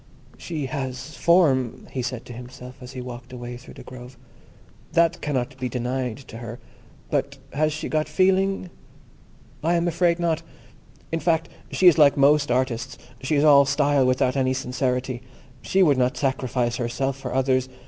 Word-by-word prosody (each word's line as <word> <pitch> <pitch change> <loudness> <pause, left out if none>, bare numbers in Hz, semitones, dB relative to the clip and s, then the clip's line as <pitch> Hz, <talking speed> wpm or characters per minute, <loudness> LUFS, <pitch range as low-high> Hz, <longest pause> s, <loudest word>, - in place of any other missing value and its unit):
"She 155 -5 -4
has 130 +1 -5
form," 140 -9 +2
he 130 - -2
said 125 -1 -4
to 120 - -9
himself, 125 +1 -10
as 125 +1 -9
he 130 - -5
walked 125 0 -9
away 120 -1 -7
through 120 - -12
the - - -11
grove—"that 130 +6 -4
cannot 135 -2 -2
be 130 -1 -2
denied 125 -1 -2
to 115 - -8
her; 115 0 -7 0.5
but 140 0 -1 0.2
has 155 +2 +1
she 150 - -4
got 155 -1 -1
feeling? 190 +2 +2 0.9
I 170 +2 +2
am 170 0 +1
afraid 170 0 +2
not. 170 -2 0 0.7
In 165 - 0
fact, 165 -1 +1 0.2
she 190 - 0
is 170 -3 +8
like 145 -2 +6
most 145 +1 +4
artists; 125 0 -1 0.2
she 140 +4 0
is 145 - +3
all 140 -2 +7
style, 140 -1 +3
without 130 0 +2
any 130 -1 +1
sincerity. 125 -1 -2 0.4
She 190 0 +3
would 145 -6 +4
not 125 0 +1
sacrifice 125 -3 0
herself 130 +3 -1
for 135 -1 -6
others. 130 -1 +1
130 Hz, 165 wpm, -24 LUFS, 125-155 Hz, 0.9 s, is